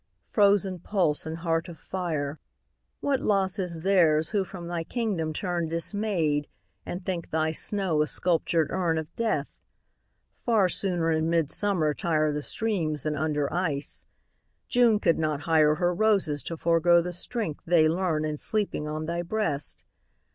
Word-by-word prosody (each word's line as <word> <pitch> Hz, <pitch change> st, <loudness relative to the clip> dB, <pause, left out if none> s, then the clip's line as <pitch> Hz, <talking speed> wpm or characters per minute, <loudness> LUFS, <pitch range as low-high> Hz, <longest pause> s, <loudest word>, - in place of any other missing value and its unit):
frozen 200 Hz, -3 st, +2 dB
pulse 170 Hz, -5 st, 0 dB
and 160 Hz, +1 st, -4 dB
heart 165 Hz, -1 st, -1 dB
of 170 Hz, -, -10 dB
fire, 155 Hz, -6 st, -3 dB, 0.6 s
What 280 Hz, -2 st, +1 dB
loss 195 Hz, -2 st, +1 dB
is 170 Hz, -3 st, -3 dB
theirs 165 Hz, -5 st, +3 dB
who 205 Hz, -3 st, +1 dB
from 185 Hz, -2 st, -9 dB
thy 170 Hz, -1 st, -3 dB
kingdom 195 Hz, -7 st, -2 dB
turn 175 Hz, 0 st, -2 dB
Dismayed, 165 Hz, -4 st, 0 dB, 0.4 s
and 180 Hz, +1 st, -5 dB
think 175 Hz, -3 st, -3 dB
thy 160 Hz, 0 st, 0 dB
snow 180 Hz, -2 st, 0 dB
a 150 Hz, -, +1 dB
sculptured 165 Hz, +2 st, +1 dB
urn 170 Hz, -3 st, 0 dB
Of 160 Hz, +1 st, -5 dB
death! 230 Hz, -1 st, 0 dB, 1.0 s
Far 215 Hz, -6 st, +3 dB
sooner 175 Hz, -3 st, 0 dB
in 160 Hz, 0 st, +1 dB
midsummer 165 Hz, 0 st, +1 dB
tire 155 Hz, -1 st, +1 dB
The 150 Hz, -, -2 dB
streams 160 Hz, -, -1 dB
than 155 Hz, -1 st, -1 dB
under 150 Hz, -1 st, -1 dB
ice. 160 Hz, -6 st, -2 dB, 0.6 s
June 240 Hz, -3 st, +4 dB
could 170 Hz, -, +2 dB
not 155 Hz, -2 st, -1 dB
hire 155 Hz, -1 st, +4 dB
Her 175 Hz, +2 st, +1 dB
roses 190 Hz, -7 st, +2 dB
to 165 Hz, -, -4 dB
forego 170 Hz, +1 st, +4 dB
the 180 Hz, 0 st, -4 dB
strength 180 Hz, -3 st, -3 dB
they 165 Hz, -2 st, +5 dB
learn 160 Hz, -2 st, 0 dB
In 155 Hz, -1 st, -3 dB
sleeping 205 Hz, -6 st, -1 dB
on 155 Hz, +1 st, -3 dB
thy 170 Hz, +2 st, -2 dB
breast. 175 Hz, -7 st, -2 dB
170 Hz, 155 wpm, -27 LUFS, 155-190 Hz, 1.0 s, they